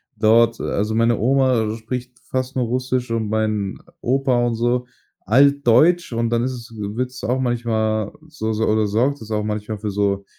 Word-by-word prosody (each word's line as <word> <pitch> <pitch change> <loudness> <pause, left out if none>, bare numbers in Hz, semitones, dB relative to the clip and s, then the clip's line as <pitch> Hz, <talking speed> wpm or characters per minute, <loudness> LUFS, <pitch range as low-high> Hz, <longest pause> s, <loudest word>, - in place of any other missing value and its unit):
dort 115 +2 +4
also, 105 +2 -1
meine 115 0 +3
Oma 125 -3 +2
spricht 125 +2 -6
fast 130 0 -3
nur 125 -2 +1
Russisch 125 0 -2
und 110 -2 -1
mein 110 -2 -1 0.2
Opa 130 -1 +1
und 120 -1 0
so, 120 +2 0 0.4
altdeutsch. 140 - +4
Und 115 0 0
dann 120 0 +1
ist 130 0 -1
es 115 -2 -10
würdest 120 +5 -4
du - - -2
auch 130 +2 +1
manchmal 110 -4 0 0.2
so 110 -8 -4
so 110 +1 0
oder 110 -1 +2
sorgt 125 +7 0
das 110 0 -9
auch 105 -1 0
manchmal 105 0 -3
für 105 0 -4
so 100 0 0
115 Hz, 180 wpm, -21 LUFS, 110-125 Hz, 0.4 s, dort